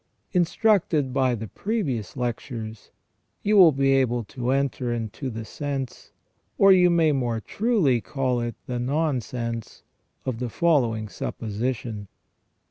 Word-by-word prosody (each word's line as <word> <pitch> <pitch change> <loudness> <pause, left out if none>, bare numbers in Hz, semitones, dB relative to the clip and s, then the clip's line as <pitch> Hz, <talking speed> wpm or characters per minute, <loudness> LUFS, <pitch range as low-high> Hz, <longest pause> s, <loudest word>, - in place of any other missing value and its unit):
Instructed 175 - +2
by 130 -2 +2
the 110 0 -6
previous 140 - -3
lectures, 115 -3 -4 0.5
you 210 +1 +2
will 180 -5 +9
be 135 0 +2
able 125 -3 +2
to 125 +3 -4
enter 135 -2 0
into 120 +3 -4
the 110 -2 -6
sense, 140 0 -5 0.5
or 195 0 +7
you 180 -1 +6
may 165 -3 +4
more 120 -5 0
truly 185 - +1
call 130 -2 -1
it 120 0 -3
the 125 -1 -3
nonsense, 125 -4 -2 0.4
of 125 -3 -2
the 125 -1 -2
following 120 -8 +1
supposition. 110 0 -4
130 Hz, 125 wpm, -25 LUFS, 115-150 Hz, 0.5 s, will